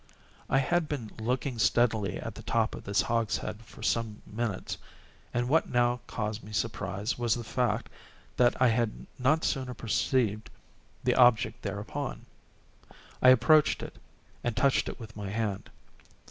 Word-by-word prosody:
I 135 - +3
had 160 +4 +1
been 120 -8 -4
looking 125 +2 -1
steadily 110 -5 +2
at - - -6
the - - -10
top - - 0
of - - -7
this 100 0 +2
hogshead 110 -1 -1
for 115 - -13
some 115 -2 0
minutes, 110 -3 -3 0.6
and 120 0 0
what 160 +5 +2
now 120 0 +2
caused 105 0 -3
me 105 - -10
surprise 105 0 -2
was 120 -2 +2
the 120 - -5
fact 125 +2 0 0.5
that 120 -1 +3
I 130 -1 +5
had 115 -1 -1
not 150 +6 +3
sooner 130 -2 -1
perceived 110 -1 0 0.5
the - - +3
object 120 -2 +4
thereupon. 105 +7 -4 1.0
I 130 - +8
approached 145 +5 +5
it, - - -8 0.5
and 120 -2 -2
touched 140 -1 +3
it - - -8
with 110 -2 -10
my 100 -2 -5
hand. 105 -2 -2
115 Hz, 150 wpm, -29 LUFS, 110-125 Hz, 1.0 s, I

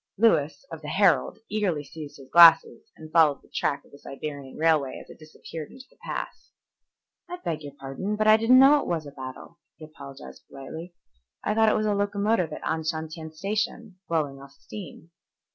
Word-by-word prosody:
Lewis, 155 -9 +2
of 160 -1 -8
the 150 - -9
Herald, 175 -6 +2
eagerly 195 -8 -1
seized 150 +1 -10
his 135 -2 -14
glasses 165 -1 +7
and 155 0 -12
followed 155 -4 +4
the - - -24
track 140 - -1
of - - -23
the 140 - -15
Siberian 140 -1 -8
railway 155 -4 +1
as - - -13
it - - -15
disappeared 155 0 -9
into 260 - -13
the - - -26
pass. - - -6 0.8
"I 355 - -5
beg 165 - -4
your 145 -2 -9
pardon, 140 +10 -4
but 215 0 0
I 215 0 +8
didn't 225 +3 +5
know 275 +3 +7
it - - -5
was 165 -3 -2
a 145 - -9
battle," 130 +5 -10 0.2
he 155 - -11
apologized 140 -3 -12
politely. 160 +6 -9 0.5
"I 210 - 0
thought 220 0 +4
it - - +2
was 215 - 0
a 210 - +1
locomotive 200 -3 0
at - - -7
Anshantien 160 0 -3
Station 205 +3 -3
blowing 145 -5 -1
off 140 0 -14
steam." 165 +1 -11
160 Hz, 190 wpm, -26 LUFS, 145-205 Hz, 0.8 s, I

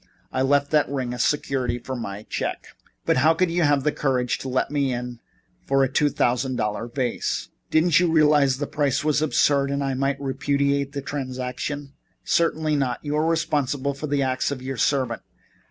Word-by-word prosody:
I 130 - -1
left 140 +1 +2
that 150 -1 +3
ring 130 -3 -2
as 125 - 0
security 130 -4 0
for 130 +2 -6
my 105 -4 -6
check." - - -4 0.4
"But - - +2
how 155 +5 +4
could 180 0 +1
you 175 +1 +1
have 145 -3 +3
the 150 - +2
courage 130 -4 0
to 135 - -5
let 130 +2 0
me 140 -2 +1
in 125 -1 -5 0.5
for 135 0 +3
a 135 - 0
two 145 0 +3
thousand 125 0 0
dollar 105 +1 -2
vase? 120 0 -2 0.2
Didn't 160 0 +4
you 175 -2 +2
realize 150 -4 +4
that 145 - -2
the - - -16
price 145 -3 +1
was 150 0 +2
absurd 140 -2 +2
and 140 0 -1
that 135 - -1
I - - -1
might 135 +1 -1
repudiate 140 +1 0
the 140 -1 -4
transaction?" 135 +1 -4 0.3
"Certainly 160 -2 +1
not. 130 0 -2
You 145 0 -1
are 155 +1 +1
responsible 145 -4 0
for 140 +3 -5
the 140 -1 +1
acts 130 -1 0
of 135 -3 -5
your 135 -1 -4
servant. 130 -3 0
140 Hz, 200 wpm, -24 LUFS, 130-145 Hz, 0.5 s, how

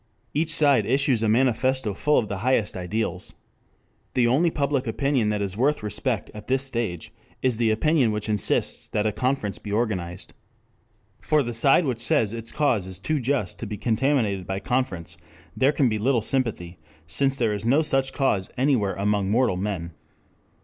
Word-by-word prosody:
Each 155 +2 0
side 140 -8 +4
issues 130 -2 +2
a 110 - +1
manifesto 130 0 +1
full 150 +9 +1
of 110 - +1
the 100 -2 -4
highest 115 -1 +1
ideals. 95 +5 -3 0.8
The 125 - +3
only 140 +9 +3
public 140 -4 -1
opinion 130 -1 +1
that 105 -1 -1
is 95 -1 -3
worth 135 +3 +1
respect 105 +2 -2
at 105 -1 -10
this 130 +1 +1
stage 115 -10 -3 0.3
is 125 -3 +2
the 115 -1 +2
opinion 125 +2 +2
which 105 0 -3
insists 105 -2 0
that 105 - -1
a 110 - +2
conference 125 -3 -2
be 105 - -7
organized. 95 -6 -2 0.9
For 150 -2 +2
the 120 -1 -4
side 135 +8 +3
which 125 -4 -2
says 110 -2 +1
its 115 0 -5
cause 125 -11 +1
is 95 -1 -5
too 150 - -1
just 125 -7 -1
to 115 - -5
be 105 0 -5
contaminated 110 -3 0
by 95 0 -2
conference 90 -9 -2 0.4
there 135 +2 +3
can 140 -3 +2
be 110 -2 -1
little 120 0 +1
sympathy, 110 -10 -2 0.3
since 135 - 0
there 115 -4 +1
is 100 0 -4
no 135 +7 +3
such 135 -3 +1
cause 105 -10 0
anywhere 125 -7 +1
among 100 0 0
mortal 115 -2 +2
men. 90 -3 -3
115 Hz, 175 wpm, -24 LUFS, 105-135 Hz, 0.9 s, side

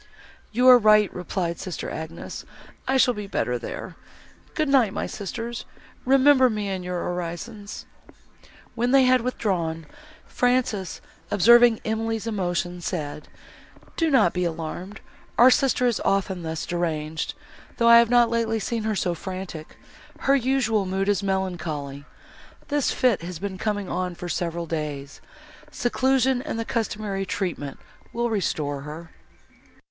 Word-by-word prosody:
"You 250 +3 +3
are 250 -1 +10
right," 215 -2 +5
replied 180 -1 -3
sister 185 -4 -5
Agnes, 160 +1 -7 0.4
"I 265 +1 +2
shall 250 -1 +4
be 210 -2 -6
better 125 -10 -1
there. - - -7 0.6
Good 310 -1 +1
night, 255 -7 +3
my - - -2
sisters, 230 +4 -5 0.4
remember 265 0 +5
me 210 -3 -2
in 190 -1 -3
your 180 -1 -3
orisons." 180 +5 -5 0.9
When 240 +1 0
they 270 +1 +6
had 255 -1 +4
withdrawn, 175 -10 -2 0.4
Frances, 245 -7 0 0.3
observing 235 +3 +6
Emily's 225 0 -2
emotion, 175 -4 -2
said, 150 -4 -4 0.7
"Do 330 -1 +1
not 260 - +4
be 180 - -1
alarmed, 170 +4 -5 0.4
our 245 +3 +8
sister 250 -1 +2
is 240 -3 +1
often 195 -2 0
thus 160 -1 -4
deranged, 160 -2 -2 0.4
though 235 - +3
I 235 0 +9
have 235 -1 +3
not 240 -1 +4
lately 225 -1 0
seen 225 +1 -3
her 220 -1 0
so 180 -2 0
frantic; 185 -2 -7 0.4
her 275 - +4
usual 240 -6 +1
mood 195 +2 -1
is 205 -1 +2
melancholy. 165 -8 -3 0.6
This 290 -2 +1
fit 245 -8 +2
has 175 0 -6
been 190 +1 -5
coming 205 -3 -2
on, 180 -1 -2
for 175 +1 -7
several 170 -1 -2
days; 150 -3 -5 0.5
seclusion 260 +1 +1
and 295 -4 -4
the 230 - -2
customary 210 -4 -2
treatment 170 -9 -3 0.4
will 235 0 -1
restore 150 -9 -1
her." 155 +3 -9
200 Hz, 140 wpm, -24 LUFS, 175-235 Hz, 0.9 s, are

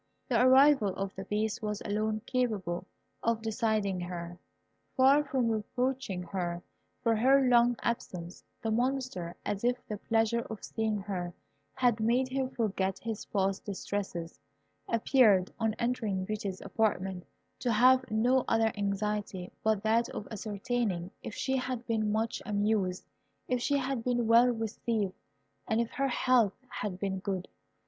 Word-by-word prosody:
The 240 -2 +3
arrival 260 -5 +6
of 195 0 -3
the 190 - -7
Beast 215 +3 -1
was 210 -1 -2
alone 215 +1 -1
capable 200 -9 -1 0.3
of 230 -1 0
deciding 215 -4 0
her. 175 0 -6 0.6
Far 270 +3 +6
from 260 -5 0
reproaching 230 -2 -2
her 175 -1 -3 0.4
for 230 -1 +3
her 265 +4 +4
long 240 0 +5
absence, 180 -7 -3 0.2
the 225 - 0
Monster, 245 -7 -1
as 200 +1 -2
if 245 +1 +2
the 210 - -4
pleasure 225 +2 +1
of 220 -3 -7
seeing 220 -2 -1
her 180 -3 -4 0.4
had 245 -3 +2
made 245 +4 +2
him 260 0 -1
forget 195 -5 -1
his 225 -2 -5
past 195 -1 0
distresses, 190 -4 -4 0.5
appeared, 225 -5 +4
on 220 -1 +1
entering 220 -6 -1
Beauty's 200 -2 -4
apartment, 190 -3 -1 0.4
to 245 - 0
have 255 +4 +5
no 245 +4 +3
other 225 -1 +3
anxiety 200 -2 -2
but 220 -2 +1
that 230 +2 +2
of 205 - -6
ascertaining 205 -3 -2
if 210 - -7
she 265 0 0
had 255 -2 -3
been 215 -2 0
much 220 +2 -1
amused, 205 -3 0 0.4
if 250 -1 0
she 285 +3 +2
had 265 -3 -2
been 245 -1 +1
well 230 +2 +6
received, 225 -3 -1 0.5
and 220 - +1
if 235 -1 -1
her 275 0 0
health 245 -5 +3
had 195 -3 -4
been 190 -1 -2
good. 190 -1 -3
220 Hz, 145 wpm, -30 LUFS, 195-245 Hz, 0.6 s, arrival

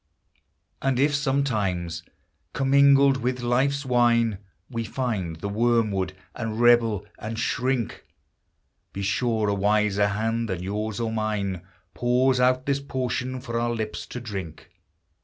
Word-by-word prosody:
And 135 -2 +1
if 145 +2 +3
sometimes, 110 - 0 0.5
commingled 140 0 +5
with 125 0 -2
life's 135 +4 +1
wine, 120 -4 +2 0.3
We 115 -2 -3
find 105 -8 -3
the 80 +5 -5
wormwood, 105 -4 +1 0.2
and 115 -2 -4
rebel 120 -4 +4
and 110 +1 -5
shrink, 125 0 -1 0.9
Be 100 - -4
sure 110 +3 0
a 100 - +2
wiser 105 0 +2
hand 115 +2 -1
than 90 -2 -3
yours 105 +3 -3
or 115 -1 -1
mine 105 -4 -2 0.3
Pours 125 +1 +2
out 130 +1 +3
this 140 0 +1
potion 130 -1 -3
for 120 -2 -3
our 120 0 0
lips 110 -2 -4
to 125 - -6
drink. 95 -9 -7
115 Hz, 130 wpm, -25 LUFS, 105-130 Hz, 0.9 s, commingled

